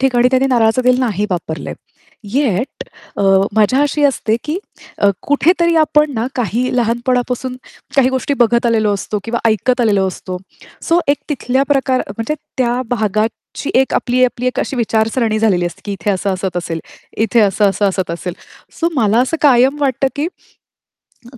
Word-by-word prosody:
ठिकाणी 250 -2 +3
त्यांनी 260 +1 +3
नारळाचं 235 0 +2
दिल 250 0 +3
नाही 210 -5 0
वापरलंय. 170 -3 -4 0.6
येट 255 -3 -1 0.3
अ, - - -1 0.3
मज्जा 220 +6 +3
अशी 290 +1 0
असते, 225 -5 +1
की 310 +4 -2 0.6
कुठेतरी 340 +4 +2
आपण 300 -1 +3
ना 225 +1 -1
काही 245 +1 -1
लहानपणापासून 250 +2 -1 0.4
काही 260 -2 +5
गोष्टी 265 +2 -1
बघत 235 0 +3
आलेलो 220 -3 +2
असतो 210 +1 -3
किंवा 235 +1 -2
ऐकत 245 +4 +1
आलेलो 205 -5 +2
असतो. 185 0 -6 0.5
सो 335 +1 +2
एक 285 - +3
तिथल्या 265 -2 0
प्रकार 270 -2 +1
म्हणजे 225 +8 -3 0.2
त्या 245 -1 +1
भागाची 220 +3 -2
एक 265 - +1
आपली, 255 +1 +2
आपली 250 0 -2
एक 255 - -1
अशी 275 - -3
विचारसरणी 225 -1 0
झालेली 185 -6 +2
असते 170 - -8
की 205 - -4
इथे 195 +2 -2
असं 195 0 -1
असत 185 -1 -4
असेल, 165 -2 -3 0.4
इथे 225 +2 +2
असं-असं 200 -1 +2
असत 190 -2 -2
असेल. 170 +1 -4 0.5
सो 335 - +2
मला 225 -4 +2
असं 260 +6 0
कायम 265 -1 +5
वाटतं, 270 -1 +1
की 295 +3 0 1.1
अ, 255 - -13
240 Hz, 160 wpm, -16 LUFS, 210-265 Hz, 1.1 s, काही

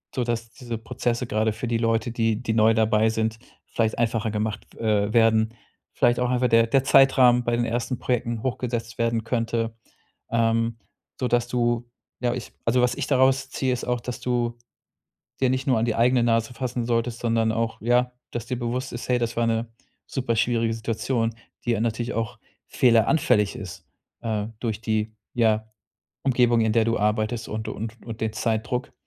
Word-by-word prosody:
sodass 115 -2 -2
diese 120 -2 -6
Prozesse, 115 +2 -2
gerade 110 0 +1
für 110 +3 -5
die 115 - +1
Leute, 115 0 +1
die 115 -1 0
die 115 - 0
neu 110 0 +5
dabei 110 0 +3
sind, 110 0 -1 0.3
vielleicht 110 -1 -1
einfacher 115 -1 0
gemacht 105 0 -3
w - - -16 0.3
äh, 105 - -5
werden. 110 -1 +4 0.4
Vielleicht 120 0 +3
auch 125 0 +1
einfach 125 -1 +2
der 115 0 +5
der 135 +3 +3
Zeitrahmen 130 -3 +5
bei 120 0 +1
den 120 - 0
ersten 120 +2 -2
Projekten 120 -2 -1
hochgesetzt 120 -3 -3
werden 115 -1 +1
könnte, 115 -1 -1 0.6
ähm, 115 0 +1 0.4
sodass 120 -1 +1
du 120 -1 0 0.4
ja, 120 -1 +1
ich 125 -3 -6
also, 125 +2 +3
was 125 - +2
ich - - -3
daraus 130 0 +3
ziehe 130 -2 0
ist 120 - -4
auch, 125 -1 -1
dass 120 -1 -5
du 120 -1 -1 0.8
dir 130 - +3
nicht 130 +2 -1
nur 125 -4 +3
an 115 - +1
die 115 - 0
eigene 120 +1 +4
Nase 115 0 +1
fassen 125 0 -3
solltest, 115 0 -1
sondern 115 -1 +1
auch, 115 0 -2
ja, 125 +2 +2 0.2
dass 120 -2 -3
dir 125 0 -3
bewusst 125 +2 -3
ist: 120 - -6
„Hey, 125 -1 +3
das 120 -1 -2
war 115 - +2
'ne 115 +1 0 0.4
super 125 -4 -2
schwierige 115 -1 +1
Situation“, 115 +1 -1 0.3
die 120 - 0
ja 110 - 0
natürlich 115 +1 -1
auch 115 -1 -3 0.3
fehleranfällig 120 -2 +3
ist, 95 -4 -9 0.4
äh, 110 -2 -2
durch 110 -2 -2
die, 110 -1 -1 0.2
ja, 110 -2 +2 0.5
Umgebung, 120 -3 +3
in 110 -1 +2
der 115 -1 +3
du 115 +1 +1
arbeitest 110 +2 0
und 110 +1 -4
und 110 +2 -6
und 115 -1 -7
den 110 - 0
Zeitdruck. 120 +4 -1
115 Hz, 180 wpm, -24 LUFS, 110-125 Hz, 0.8 s, neu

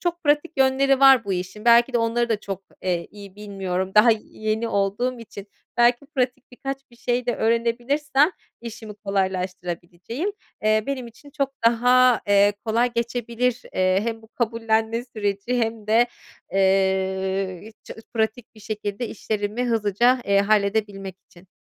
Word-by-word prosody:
çok 345 -2 -3
pratik 295 +3 +2
yönleri 270 0 +3
var 270 -4 +7
bu 195 - -2
işin, 185 +4 -5
belki 235 +2 +5
de 240 - +2
onları 230 +1 0
da 220 -3 0
çok, 195 -1 -6 0.2
eee, 175 -2 -1
iyi 200 -1 -12
bilmiyorum 190 -2 -3
daha 215 +3 +7
yeni 215 +1 -3
olduğum 205 +6 -1
için. 205 -3 -10 0.3
Belki 240 +3 +3
pratik 255 0 -1
birkaç 270 +2 -5
bir 235 - -19
şey 245 0 -1
de 240 - +1
öğrenebilirsem 245 +7 +1 0.3
işimi 220 -2 -8
kolaylaştırabileceğim, 185 - -3 0.3
eee, 215 0 +3
benim 265 -3 -3
için 285 +5 -15
çok 275 -2 -1 0.2
daha, 245 +1 +4
eee, 205 0 +5
kolay 235 +2 +1
geçebilir, 235 +1 -1
eee, 185 +1 +2
hem 225 -1 -3
bu 220 - -17
kabullenme 225 0 -1
süreci 215 +1 -2
hem 225 -2 -2
de, 230 +3 +4 0.5
eee, 190 -1 +1
i 220 - -12
ça - - -9 0.2
pratik 220 +1 -2
bir 215 - -16
şekilde 210 +2 -4
işlerimi 215 +2 -3
hızlıca, 235 +2 +2
eee, 200 0 +3
halledebilmek 200 -2 0
için. 175 +1 -19
225 Hz, 145 wpm, -23 LUFS, 200-245 Hz, 0.5 s, var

